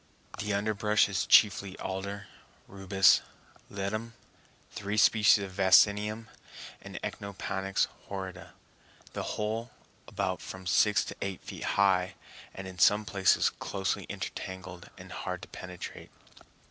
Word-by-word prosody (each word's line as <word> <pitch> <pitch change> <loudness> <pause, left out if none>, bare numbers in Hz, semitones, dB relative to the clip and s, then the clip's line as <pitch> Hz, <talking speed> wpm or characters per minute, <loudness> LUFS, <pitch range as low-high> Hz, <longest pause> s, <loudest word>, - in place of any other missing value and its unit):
The 105 - -2
underbrush 105 +1 +2
is 95 -2 -2
chiefly 100 -2 +5
alder, 100 +2 -5 0.4
rubus, 95 0 +4 0.5
ledum, 110 +4 -4 0.6
three 100 +1 -4
species 105 -1 +5
of 95 - -6
vaccinium, 105 +3 +4 0.6
and - - -8
Echinopanax 95 -1 -2 0.2
horrida, 95 -2 -7 0.6
the - - -3 0.2
whole 110 +3 -2 0.4
about 95 0 -2
from 95 0 -9
six 105 +3 +3
to - - -7
eight 100 -2 -4
feet - - -8
high, 95 -2 +3 0.4
and 95 0 -8
in 90 -1 -10
some 105 +4 +5
places 100 -2 +3
closely 95 -2 -3
intertangled 95 -1 -7
and - - -12
hard - - -5
to - - -8
penetrate. 90 -1 -8
100 Hz, 120 wpm, -30 LUFS, 95-105 Hz, 0.6 s, chiefly